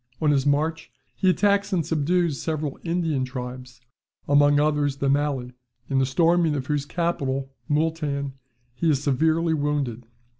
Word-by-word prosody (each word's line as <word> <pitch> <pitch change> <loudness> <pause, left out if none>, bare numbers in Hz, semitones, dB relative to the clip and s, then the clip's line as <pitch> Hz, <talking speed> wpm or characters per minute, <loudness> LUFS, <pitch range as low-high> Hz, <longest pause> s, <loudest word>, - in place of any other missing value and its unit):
On 155 -2 +2
his 140 -1 +1
march 155 +3 0 0.3
he 190 - +2
attacks 200 +2 +2
and 170 -5 0
subdues 160 -2 0
several 155 -3 -3
Indian 165 -5 0
tribes, 125 -1 -7 0.5
among 145 0 +5
others 145 -2 +1
the 140 -1 0
Malli; 140 -3 -1 0.4
in 135 - +3
the 130 - +2
storming 165 +2 +2
of 135 -2 -3
whose 145 0 -1
capital 135 -6 -2 0.2
(Mooltan), 150 -3 -1 0.4
he 165 +6 0
is 140 -2 +1
severely 160 +4 +2
wounded. 145 -6 -2
145 Hz, 145 wpm, -24 LUFS, 135-165 Hz, 0.5 s, among